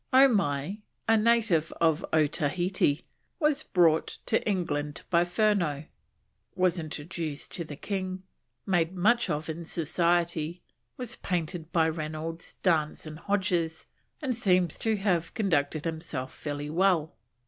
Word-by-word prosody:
Omai, 200 - +3 0.3
a 225 - +5
native 215 -8 +3
of 160 -1 +2
Otaheite, 160 +1 +1 0.4
was 300 -2 +2
brought 165 - +2
to 225 - +1
England 150 -6 -2
by 170 -1 +5
Furneaux, 175 -5 +1 0.7
was 185 -1 +2
introduced 155 -1 -5
to 170 - -3
the 155 -2 -8
King, 185 +2 -4 0.4
made 175 -1 +1
much 235 +7 +3
of 150 +1 -2
in 165 +1 -4
Society, 170 0 0 0.3
was 250 -2 -4
painted 170 -2 -3
by 160 -1 +3
Reynolds, 160 +1 -4
Dance, 160 -5 +1
and 155 0 -8
Hodges, 180 -5 0 0.4
and 260 -4 0
seems 185 -7 +2
to 220 -1 +1
have 180 -4 0
conducted 155 -8 +1
himself 160 -5 -4
fairly 145 0 -5
well. 175 -2 +2
170 Hz, 125 wpm, -28 LUFS, 155-190 Hz, 0.7 s, a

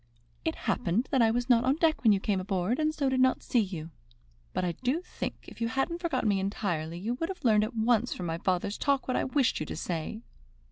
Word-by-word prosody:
"It 320 - -1
happened 225 +4 +1
that 265 - +3
I 225 - +5
was 240 +2 0
not 240 -2 +5
on 260 +2 +3
deck 320 0 +2
when 225 - +5
you 200 - +3
came 195 -1 0
aboard, 190 - -1
and 310 0 +2
so 295 -3 -1
did 260 -1 +1
not 260 0 +3
see 245 - +2
you. 175 -6 -3 0.6
But - - -1
I 175 - 0
do 255 - -1
think, - - -5
if - - -12
you 230 - +2
hadn't 270 +9 -1
forgotten 335 -9 0
me 200 -1 +2
entirely, 175 -5 -2
you 215 +7 -2
would 330 - -1
have 375 -7 -7
learned 215 -2 +5
at 235 +3 -7
once 230 +1 +2
from 180 - -4
my 165 0 -2
father's 185 +2 -1
talk 280 -2 +1
what 255 - 0
I - - +1
wished 265 -1 +1
you 155 - -2
to - - -5
say." 170 +7 -4
230 Hz, 245 wpm, -29 LUFS, 190-265 Hz, 0.6 s, I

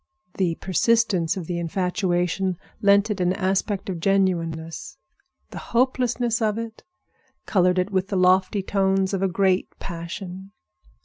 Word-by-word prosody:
The 175 -4 +1
persistence 195 -2 +1
of 180 - -4
the 170 +1 -3
infatuation 180 +1 -1 0.2
lent 200 +1 +4
it 200 -3 -2
an 180 0 +2
aspect 195 +1 -1
of 185 -3 -3
genuineness. 165 -4 -1 0.5
The - - -6
hopelessness 245 -1 0
of 215 -1 +1
it 230 -1 -6 0.6
colored 180 -2 +2
it 185 +3 0
with 190 -1 0
the 200 - -2
lofty 185 +2 +3
tones 195 0 +1
of 195 - -1
a 195 - +3
great 190 0 +1
passion. 185 +2 -7
190 Hz, 135 wpm, -24 LUFS, 180-200 Hz, 0.6 s, lent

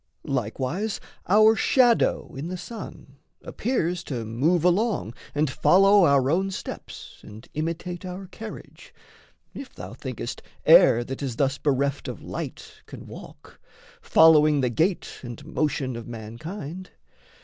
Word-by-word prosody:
Likewise, 135 - -2 0.3
our 215 +3 +6
shadow 245 0 +2
in 135 +4 -5
the 185 +1 -4
sun 185 - -9 0.3
appears 180 -8 -2
To 120 -5 -4
move 150 +10 +1
along 180 - +1 0.2
and 150 +1 +2
follow 195 +7 +5
our 140 -2 +3
own 190 +4 +1
steps 190 - -8
And 110 +3 -12
imitate 170 +3 -4
our 185 +1 -6
carriage 215 +4 -11 0.6
if 275 - -9
thou - - -8
thinkest - - -6 0.2
Air 120 - +7
that 135 +3 -7
is 130 -4 -3
thus 135 +2 0
bereft 140 -1 0
of - - -6
light - - -7
can - - -10
walk, - - -13 0.4
Following 155 -2 +5
the 125 -2 0
gait 170 - -1
and 120 +3 -9
motion 145 -5 -1
of 115 -1 -7
mankind. 145 - -7
155 Hz, 130 wpm, -25 LUFS, 130-190 Hz, 0.6 s, Air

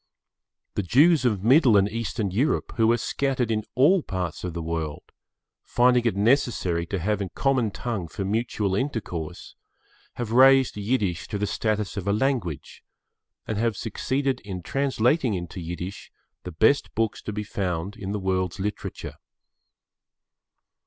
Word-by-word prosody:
The - - -1
Jews 145 - +4
of 105 -6 +1
Middle 125 -2 +6
and 100 0 +4
Eastern 110 -2 -3
Europe, 125 +11 0
who 115 0 +4
are 120 - +3
scattered 130 0 -1
in 110 -1 0
all 160 +9 +5
parts 90 - -4
of 90 -2 -4
the 85 - -3
world, 80 -2 -3 0.6
finding 125 0 +3
it 115 - +1
necessary 100 -7 +1
to 100 - -2
have 105 +4 -1
a 95 - -3
common 130 +1 +1
tongue 100 -4 -4
for 95 +5 -5
mutual 105 -1 -1
intercourse, 95 - -4 0.6
have 120 -3 -4
raised 135 +1 +6
Yiddish 105 -4 -1
to 105 - -3
the 105 - -1
status 105 0 -2
of 100 0 -4
a 100 - +2
language, 110 - -2 0.6
and 110 -2 -3
have 115 -3 0
succeeded 130 +5 -1
in 95 -4 -7
translating 135 - +1
into 85 0 -6
Yiddish 90 +3 -6 0.3
the 90 - -5
best 110 - +2
books 110 -1 -1
to - - -5
be 105 0 -3
found 95 -2 -3
in 95 0 -5
the 105 - -1
world's 95 0 -1
literature. 105 +2 -5
105 Hz, 150 wpm, -25 LUFS, 95-125 Hz, 0.6 s, Middle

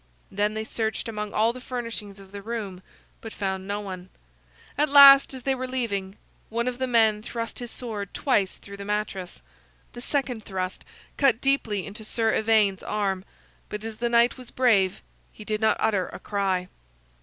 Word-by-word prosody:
Then 205 +2 0
they 220 - -2
searched 220 +2 -2
among 210 -2 -4
all 225 +2 +2
the 255 - -10
furnishings 230 -5 -5
of 195 -1 -15
the 200 0 -7
room, 205 -4 -5 0.4
but 225 - -8
found 190 -1 -3
no 205 +1 -2
one. 185 -2 -7 0.7
At 300 +1 +2
last, 275 -1 +9
as 260 -2 -8
they 270 - +1
were 255 0 -4
leaving, 205 -7 -2 0.3
one 235 +2 -1
of 250 0 -3
the 260 - 0
men 220 -3 +3
thrust 230 0 -5
his 240 -1 -6
sword 210 -6 -5
twice 205 -9 +1
through 200 0 -11
the 200 - -7
mattress. 200 - -4 0.5
The 240 - -8
second 255 -4 -2
thrust 185 -2 -4 0.3
cut 275 -5 +3
deeply 230 -9 0
into 210 +2 -9
Sir 225 +1 0
Ivaine's 215 -3 +3
arm; 195 -3 -1 0.5
but 210 0 -5
as 225 -1 -6
the 240 0 -1
knight 235 +1 +4
was 250 - -9
brave, 205 -7 +2 0.3
he 215 - -12
did 215 0 -2
not 220 - +3
utter 200 -4 +1
a - - -8
cry. 190 -3 -1
215 Hz, 180 wpm, -26 LUFS, 200-240 Hz, 0.7 s, last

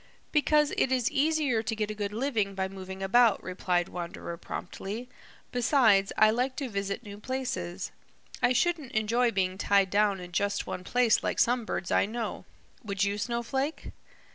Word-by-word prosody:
"Because 300 -1 +3
it 265 - +2
is 255 -3 +1
easier 295 -5 +2
to 225 0 -3
get 215 -1 -2
a - - -3
good 205 -1 -3
living 220 -4 -1
by 190 0 -1
moving 190 0 -7
about," 230 +3 +4
replied 180 -1 0
Wanderer 170 -1 -6
promptly. 205 +7 -6 0.4
"Besides, 235 -6 +4
I 215 0 +6
like 250 +3 0
to 275 -4 -3
visit 200 +1 -3
new 205 -2 -9
places. 195 -8 -4 0.5
I - - +4
shouldn't 290 +1 0
enjoy 230 +3 +2
being 190 -3 -1
tied 200 -3 +3
down 205 -1 +2
in 180 -1 -9
just 200 +3 0
one 180 - -5
place 245 +3 +3
like - - -2
some 245 -1 +2
birds 180 - -3
I - - +3
know. 230 +1 -4 0.4
Would 200 -2 -1
you, 200 +1 0
Snowflake?" 245 +7 -2
215 Hz, 165 wpm, -29 LUFS, 195-250 Hz, 0.5 s, I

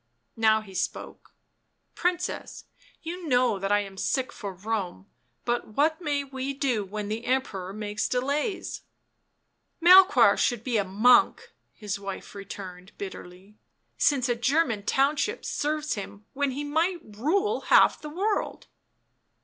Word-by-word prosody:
How 220 0 +4
he 200 -3 -13
spoke. 185 0 -5 0.3
" - - -49
Princess, 360 +1 -3 0.4
you 340 +1 -6
know 250 -6 +2
that 195 +1 -2
I 205 0 +4
am 195 -1 -9
sick 260 +7 -1
for 200 -2 -6
Rome, 190 - -4 0.4
but 240 -3 -2
what 315 +4 +2
may 290 -3 -1
we 270 0 -5
do 260 -6 0
when 205 +1 -5
the 220 +3 -4
Emperor 210 -8 -1
makes 210 +1 -3
delays 285 - -2 0.4
?" - - -49
" - - -49
Melchoir 370 +3 +7
should 240 -3 0
be 240 -3 0
a 205 - +2
monk," 245 - +3 0.2
his 205 -2 -4
wife 195 -1 -7
returned 190 -2 -9
bitterly, 190 +1 -10 0.2
" - - -48
since 270 -4 +3
a 240 - +2
German 240 -2 +1
township 290 - +1
serves 305 +1 -1
him 205 0 -8
when 285 0 0
he 275 +3 -4
might 325 +4 0
rule 395 - 0
half - - +5
the 300 - -7
world." 395 +7 -2
250 Hz, 150 wpm, -26 LUFS, 205-300 Hz, 0.4 s, Melchoir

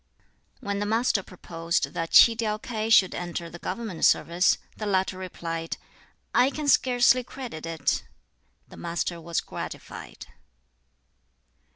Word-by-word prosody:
When 200 0 -2
the 205 - -1
Master 225 -1 +2
proposed 170 -2 -3
that 165 -1 -3
Tsi 230 - +8
tiau 215 -2 -1
K'ai 220 -1 -3
should 190 -4 +6
enter 170 -1 -5
the 175 - -10
government 215 -6 -5
service, 175 +3 +4 0.2
the 215 - -5
latter 190 -1 +1
replied, 165 -3 -5 0.6
"I 255 - +5
can 295 +1 -5
scarcely 250 -2 +4
credit 245 - -8
it." 165 -1 -1 0.6
The - - -14
Master 170 0 -3
was 170 0 -1
gratified. - - -8
190 Hz, 130 wpm, -26 LUFS, 170-230 Hz, 0.6 s, Tsi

